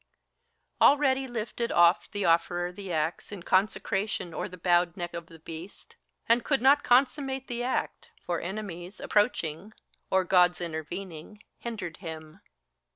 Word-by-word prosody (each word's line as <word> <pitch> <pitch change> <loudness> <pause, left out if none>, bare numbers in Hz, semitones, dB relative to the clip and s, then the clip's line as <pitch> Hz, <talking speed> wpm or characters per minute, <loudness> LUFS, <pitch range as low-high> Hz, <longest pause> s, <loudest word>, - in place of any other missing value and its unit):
Already 270 -2 +4
lifted 235 0 -3
oft 175 +1 +4
the 205 -1 -2
Offerer 175 +1 +2
the 190 0 -8
axe 160 +3 -2
In 195 -4 -7
consecration 195 -1 0
o'er - - -3
the 180 - -10
bowed 175 0 +2
neck 175 -1 -5
of 170 -1 -6
the 165 -2 -13
beast. 165 +4 -10 0.3
And 230 +1 +4
could 275 -2 +2
not 275 +3 +5
consummate 265 +1 +2
the 240 0 -3
act; 250 +1 -2 0.2
for 175 -1 -1
enemies 185 -1 -6
Approaching, 205 -3 0 0.4
or 190 0 +3
Gods 180 -2 +4
intervening, 175 +4 -6 0.2
hindered 220 -8 -6
him. 160 0 -9
185 Hz, 140 wpm, -28 LUFS, 170-230 Hz, 0.4 s, not